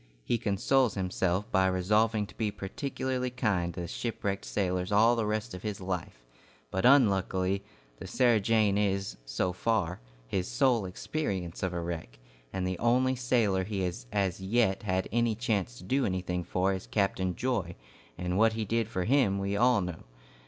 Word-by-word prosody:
He 120 - +1
consoles 115 +4 +2
himself 95 0 -1
by 95 -1 +4
resolving 105 +4 +2
to - - -14
be 110 -2 -1
particularly 125 +5 -3
kind 105 -9 0
to 90 -1 -4
shipwrecked 100 -1 -3
sailors 90 -1 -1
all 110 +4 +5
the 115 -2 -1
rest 110 +1 -2
of 90 - -7
his 105 -2 -4
life; 90 -10 -5 0.5
but 95 - 0
unluckily, 95 -7 +3 0.4
the 95 - -7
"Sarah 120 +2 +3
Jane" 105 -1 +2
is, 100 -1 -1
so 90 +10 -1
far, 90 -3 0 0.3
his 95 +6 -1
sole 125 -4 +2
experience 95 - -3
of 95 - 0
a 85 - -3
wreck, 80 -8 -5 0.3
and 95 -1 -2
the 95 -1 -3
only 130 +2 +3
sailor 115 -7 +1
he 100 0 -3
has 85 -10 -3
as 95 -2 0
yet 100 0 +1
had 95 -3 -1
any 115 -1 +2
chance 100 - -1
to - - -11
do 130 +9 +1
anything 90 -3 -1
for 95 +3 0
is 95 - -5
Captain 95 -3 0
Joy, 105 -9 -1 0.4
and 90 +2 -1
what 110 0 +5
he 110 -1 -2
did 115 +1 0
for 95 -5 -2
him 120 -4 +3
we 100 +1 -1
all 120 0 +4
know. 90 -3 -5
100 Hz, 175 wpm, -29 LUFS, 90-115 Hz, 0.5 s, all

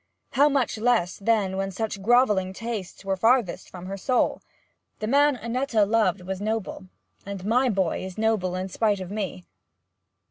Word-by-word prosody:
How 285 +2 +4
much 270 -6 0
less, 225 -6 +1
then, 200 -3 +1
when 195 0 -1
such 210 +1 -4
grovelling 210 -4 +3
tastes 215 -3 -6
were 195 0 0
farthest 225 0 +1
from 180 -1 -9
her 195 +1 -5
soul! 250 +6 +1 0.6
The 215 - -4
man 285 +4 +4
Annetta 235 -2 0
loved 215 -2 +1
was 190 +1 -5
noble, 215 -2 -3 0.4
and 195 -1 -7
my 250 +4 +3
boy 190 -6 0
is 190 -1 -7
noble 215 -5 +1
in 185 +1 -3
spite 205 +1 0
of 185 0 -7
me.' 190 - -4
210 Hz, 165 wpm, -25 LUFS, 190-230 Hz, 0.6 s, How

